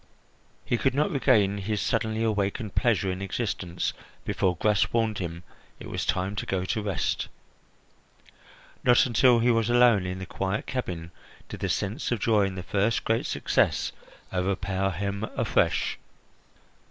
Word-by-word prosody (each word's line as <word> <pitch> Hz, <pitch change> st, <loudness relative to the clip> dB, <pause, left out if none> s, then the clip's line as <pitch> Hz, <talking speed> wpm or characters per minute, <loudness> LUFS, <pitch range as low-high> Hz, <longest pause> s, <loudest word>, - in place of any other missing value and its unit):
He 120 Hz, -, 0 dB
could 130 Hz, -1 st, +1 dB
not 150 Hz, +2 st, +2 dB
regain 105 Hz, -8 st, +3 dB
his 105 Hz, +2 st, -2 dB
suddenly 110 Hz, +1 st, 0 dB
awakened 105 Hz, 0 st, -1 dB
pleasure 110 Hz, -6 st, +2 dB
in 90 Hz, +1 st, -5 dB
existence 95 Hz, -3 st, -2 dB, 0.3 s
before 90 Hz, -2 st, 0 dB
Gras 105 Hz, +3 st, +2 dB
warned 110 Hz, -2 st, 0 dB
him 85 Hz, -1 st, -5 dB, 0.4 s
it -, -, -8 dB
was -, -, -3 dB
time 95 Hz, +2 st, 0 dB
to -, -, -2 dB
go 95 Hz, -1 st, -1 dB
to 110 Hz, +3 st, -1 dB
rest. 100 Hz, -4 st, -1 dB, 1.6 s
Not 120 Hz, -1 st, +5 dB
until 125 Hz, 0 st, +4 dB
he 120 Hz, +1 st, +3 dB
was 115 Hz, -1 st, +1 dB
alone 120 Hz, -6 st, +5 dB
in 90 Hz, 0 st, -4 dB
the 95 Hz, -, -6 dB
quiet 95 Hz, +3 st, -2 dB
cabin 90 Hz, -10 st, -4 dB, 0.4 s
did -, -, -7 dB
the -, -, -2 dB
sense 105 Hz, +10 st, -2 dB
of 120 Hz, -, 0 dB
joy 105 Hz, -2 st, +3 dB
in 95 Hz, -, -6 dB
his 90 Hz, -1 st, -6 dB
first 105 Hz, +2 st, +1 dB
great 115 Hz, +1 st, +1 dB
success -, -, +1 dB, 0.4 s
overpower 95 Hz, +1 st, 0 dB
him 100 Hz, +3 st, -3 dB
afresh. -, -, +1 dB
100 Hz, 155 wpm, -27 LUFS, 95-115 Hz, 1.6 s, Not